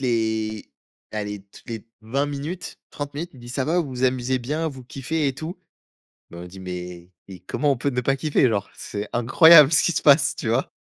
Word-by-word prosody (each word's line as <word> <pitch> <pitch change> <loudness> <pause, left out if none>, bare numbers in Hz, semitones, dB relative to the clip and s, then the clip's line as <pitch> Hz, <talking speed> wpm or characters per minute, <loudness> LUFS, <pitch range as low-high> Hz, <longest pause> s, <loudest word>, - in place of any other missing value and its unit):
les 110 -3 -1 0.4
allez 105 -1 -4
toutes - - -17
les 115 -1 -6
20 125 +6 -1
minutes, 145 +5 -6
30 145 0 -6
minutes, 170 +4 -5
il 130 - -14
dit: 120 - -11
«Ça 130 +1 -2
va, 170 +3 +2
vous 155 - -4
vous 130 0 -2
amusez 130 0 +1
bien? 150 +7 -2
Vous 135 -3 -9
kiffez 140 +4 -2
et 135 - -3
tout?» 160 +6 -7 0.7
bah, 85 - -10
on 90 - -8
dit: 95 +2 -11
«Mais 90 -1 -7 0.2
mais 95 -2 -10
comment 145 +10 0
on - - -1
peut 140 +4 -1
ne 125 -1 -1
pas 135 +2 +1
kiffer? 140 -2 +2
Genre, 105 -4 -2
c'est 105 +1 -6
incroyable 150 +5 +7
ce 155 - +5
qui - - +2
se - - -2
passe», 145 -1 +5
tu 110 - -4
vois? 115 - 0
130 Hz, 220 wpm, -23 LUFS, 110-145 Hz, 0.7 s, incroyable